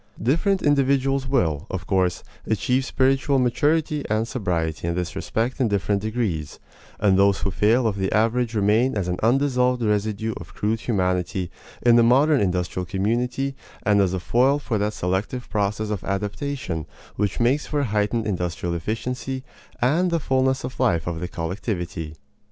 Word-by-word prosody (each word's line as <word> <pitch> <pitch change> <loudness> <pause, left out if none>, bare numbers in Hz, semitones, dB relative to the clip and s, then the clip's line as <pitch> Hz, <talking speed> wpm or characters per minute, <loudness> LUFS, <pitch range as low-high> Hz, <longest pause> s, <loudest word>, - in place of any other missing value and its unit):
Different 170 - +1
individuals 135 -1 +2
will, 90 - 0
of 95 -2 -4
course, 90 -5 +1 0.2
achieve 125 +4 +1
spiritual 135 +1 +2
maturity 145 +4 +1
and 110 +1 +1
sobriety 85 - -2
in 85 - -1
this 90 -1 -3
respect 120 +5 -2
in 125 - +3
different 100 -1 0
degrees; 105 - -2 0.4
and 100 -2 +3
those 100 0 +4
who 100 - -1
fail 115 +6 +3
of 105 -3 0
the 95 -1 -1
average 115 +2 +1
remain 110 +4 +2
as 95 -3 -1
an 90 0 -2
undissolved 125 0 +2
residue 105 +1 0
of 85 - -11
crude 110 +2 0
humanity 90 -4 -1 0.3
in 120 -1 +6
the - - +7
modern 135 +5 +4
industrial 90 -1 -1
community 120 +8 -1 0.3
and 100 0 +4
as 95 -2 +2
a - - -2
foil 130 +9 +3
for 120 -7 -2
that 105 +1 0
selective 95 +7 -2
process 105 0 -1
of 100 -5 -3
adaptation 105 - -3 0.3
which 100 -2 -1
makes 130 +5 +2
for 145 -1 0
a - - 0
heightened 105 +1 0
industrial 90 -3 -2
efficiency 125 - -3 0.4
and 165 +9 +3
the 170 -1 +1
fullness 130 -1 +1
of 125 +1 -6
life 90 -11 +2
of 85 -1 -3
the 90 - -3
collectivity. 85 -2 -4
110 Hz, 165 wpm, -23 LUFS, 95-130 Hz, 0.4 s, the